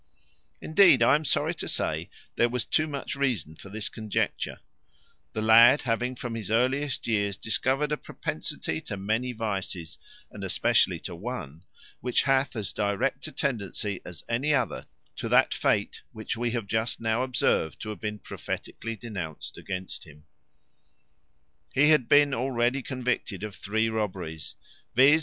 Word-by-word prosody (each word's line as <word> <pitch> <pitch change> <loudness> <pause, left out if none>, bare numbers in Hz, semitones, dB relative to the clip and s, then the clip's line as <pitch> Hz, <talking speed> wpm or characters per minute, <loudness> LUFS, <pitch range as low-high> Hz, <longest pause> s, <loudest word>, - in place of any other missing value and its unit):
Indeed, 190 +4 +6
I - - +6
am 150 +2 +3
sorry 145 - +1
to - - -6
say - - -1 0.3
there 120 - +3
was 125 -1 -1
too 155 0 +2
much 140 -2 -4
reason 120 - -1
for 100 - -12
this 105 +1 -3
conjecture; 110 -2 -2 0.7
the 110 - -2
lad 115 +5 +7
having 125 +2 0
from 120 -1 -5
his 115 -2 -5
earliest 130 +5 +1
years 100 -3 0
discovered 130 +7 +1
a 150 - +1
propensity 80 - -3
to 100 - -5
many 110 +6 -1
vices, 100 -7 -3 0.3
and - - -8
especially - - +3
to - - -6
one 90 - -6 0.3
which 125 -1 +1
hath 135 -1 +2
as 110 -3 -3
direct 105 +8 0
a - - -8
tendency 105 - -2
as 85 -4 -9
any 135 +6 +2
other 125 -5 -1 0.3
to - - -3
that - - +5
fate - - 0
which 110 +1 -4
we 120 +1 -1
have 115 -2 -2
just 110 +3 -1
now 115 +1 +1
observed 125 - +1
to 110 - -5
have 105 -4 -6
been 105 +2 -3
prophetically 115 +2 -5
denounced 95 -8 -6
against 95 -1 -5
him: 75 -2 -16 1.5
he 145 +3 +6
had 150 -6 +4
been 145 -1 +6
already 125 +1 +1
convicted 125 -6 -2
of 105 -2 -5
three 110 +3 0
robberies, 95 -8 -3 0.4
viz. 140 +5 +7
115 Hz, 155 wpm, -27 LUFS, 100-130 Hz, 1.5 s, lad